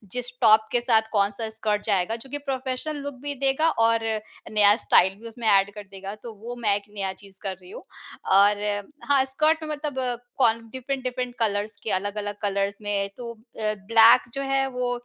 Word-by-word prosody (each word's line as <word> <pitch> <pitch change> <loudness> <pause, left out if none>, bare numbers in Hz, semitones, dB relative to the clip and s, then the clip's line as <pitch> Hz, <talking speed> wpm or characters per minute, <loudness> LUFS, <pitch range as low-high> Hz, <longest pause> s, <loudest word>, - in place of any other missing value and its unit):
जिस 245 -1 -4
टॉप 220 -1 +6
के 245 - +2
साथ 230 -2 +4
कौन-सा 205 +1 0
स्कर्ट 215 -1 -2
जायेगा, 200 0 +1
जोकि 265 +5 -7
प्रोफेशनल 260 +3 -3
लुक 285 0 -4
भी 290 0 -3
देगा 275 +4 +3 0.2
और 230 0 +3 0.5
नया 210 -1 +6
स्टाइल 190 +2 +5
भी 230 - -9
उसमें 230 0 -5
एड 195 +1 +3
कर 210 0 -8
देगा, 195 +1 -7
तो 225 +2 -10
वो 240 +1 -5
मैं 210 -3 +3
एक 205 - -4
नया 195 -2 -2
चीज़ 195 -1 -15
कर 195 - -2
रही 180 - -14
हूँ। - - -9 0.5
और 205 +1 +4 0.5
हाँ, 275 -2 +5
स्कर्ट 310 +4 +1
मतलब 285 -5 -3 0.2
कौन 230 -3 +3
डिफरेंट-डिफरेंट 255 -1 -4
कलर्स 210 -1 -1
के, 220 - -2
अलग-अलग 205 +1 -2
कलर्स 200 -1 0
में 200 -1 -1
तो 235 -1 -6 0.3
अ, 215 -1 0
ब्लैक 230 +2 +7
जो 275 - -3
है 270 0 +1
वो 250 -1 -2
225 Hz, 185 wpm, -25 LUFS, 205-255 Hz, 0.5 s, ब्लैक